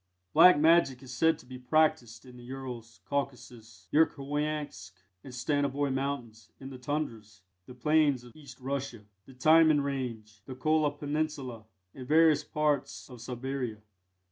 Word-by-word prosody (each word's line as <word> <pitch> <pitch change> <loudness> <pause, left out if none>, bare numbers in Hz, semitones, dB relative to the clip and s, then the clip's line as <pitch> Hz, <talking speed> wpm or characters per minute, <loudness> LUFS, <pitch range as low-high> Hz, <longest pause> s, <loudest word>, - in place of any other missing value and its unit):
Black 180 -3 +8
Magic 150 -4 +3
is 130 -1 -9
said 160 +5 +2
to - - -17
be 125 0 -10
practised 130 -4 +1
in 125 -1 -13
the 120 - -13
Urals, 125 -3 -8
Caucasus, 120 -8 -5
Yerkhoiansk, 145 - -1 0.3
and 130 - -10
Stanovoi 140 +2 -1
Mountains; 120 -6 -4
in 135 0 -9
the 130 - -9
Tundras, 115 -7 -4 0.3
the 125 - -11
Plains 150 -1 +2
of 120 -2 -15
East 140 -4 -13
Russia, 130 -4 -5 0.2
the 135 - -14
Timan 155 +2 +5
Range, 115 -6 -5
the 130 - -7
Kola 155 +3 +2
Peninsula, 145 -5 -4 0.3
and 130 -2 -9
various 155 -1 +4
parts 145 -11 -2
of 125 -2 -11
Siberia. 125 -1 -4
135 Hz, 145 wpm, -29 LUFS, 120-150 Hz, 0.3 s, Black